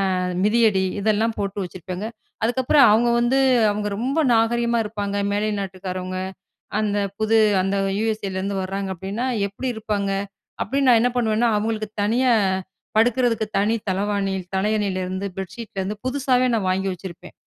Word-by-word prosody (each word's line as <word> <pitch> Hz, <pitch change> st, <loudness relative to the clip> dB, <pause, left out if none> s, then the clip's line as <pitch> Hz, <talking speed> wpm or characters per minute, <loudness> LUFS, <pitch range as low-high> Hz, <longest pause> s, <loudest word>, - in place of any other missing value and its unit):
அ -, -, -1 dB, 0.3 s
மிதியடி 210 Hz, -3 st, +3 dB, 0.2 s
இதெல்லாம் 220 Hz, +2 st, +1 dB
போட்டு 200 Hz, 0 st, -3 dB
வச்சிருப்பேங்க. 185 Hz, +2 st, -6 dB, 0.4 s
அதுக்கப்பறம், 260 Hz, +4 st, +4 dB
அவங்க 235 Hz, +3 st, +4 dB
வந்து 240 Hz, +3 st, +2 dB, 0.3 s
அவங்க 210 Hz, 0 st, -2 dB
ரொம்ப 265 Hz, +7 st, -1 dB
நாகரீகமா 235 Hz, +1 st, +2 dB
இருப்பாங்க 205 Hz, -1 st, -4 dB, 0.2 s
மேலை 205 Hz, +1 st, 0 dB
நாட்டுக்காரவங்க, 185 Hz, -1 st, -4 dB, 0.6 s
அந்த 205 Hz, -1 st, 0 dB, 0.2 s
புது 220 Hz, +1 st, +3 dB, 0.2 s
அந்த 195 Hz, +1 st, 0 dB, 0.2 s
யுஎஸ்ஏலேருந்து 200 Hz, -3 st, -2 dB
வர்றாங்க 195 Hz, +1 st, -3 dB
அப்டின்னா, 195 Hz, +8 st, -4 dB, 0.2 s
"எப்டி 200 Hz, +6 st, -5 dB
இருப்பாங்க?" 205 Hz, -2 st, -2 dB, 0.5 s
அப்டின்னு 275 Hz, 0 st, 0 dB
நான் 235 Hz, -, +6 dB
என்ன 245 Hz, -, +3 dB
பண்ணுவேன்னா 230 Hz, -1 st, +2 dB
அவங்களுக்கு 215 Hz, 0 st, -2 dB
தனியா 245 Hz, +4 st, +3 dB, 0.6 s
படுக்குறதுக்கு 230 Hz, 0 st, +2 dB
தனி 215 Hz, +3 st, +2 dB
தளவாணி 200 Hz, 0 st, 0 dB, 0.2 s
தலையணைலருந்து 190 Hz, -2 st, -1 dB
பெட்ஷீட்லேருந்து 195 Hz, +1 st, -5 dB
புதுசாவே 255 Hz, -1 st, +2 dB
நான் 210 Hz, -5 st, 0 dB
வாங்கி 190 Hz, +1 st, 0 dB
வச்சிருப்பேன். 180 Hz, 0 st, -9 dB
210 Hz, 125 wpm, -22 LUFS, 195-230 Hz, 0.6 s, நான்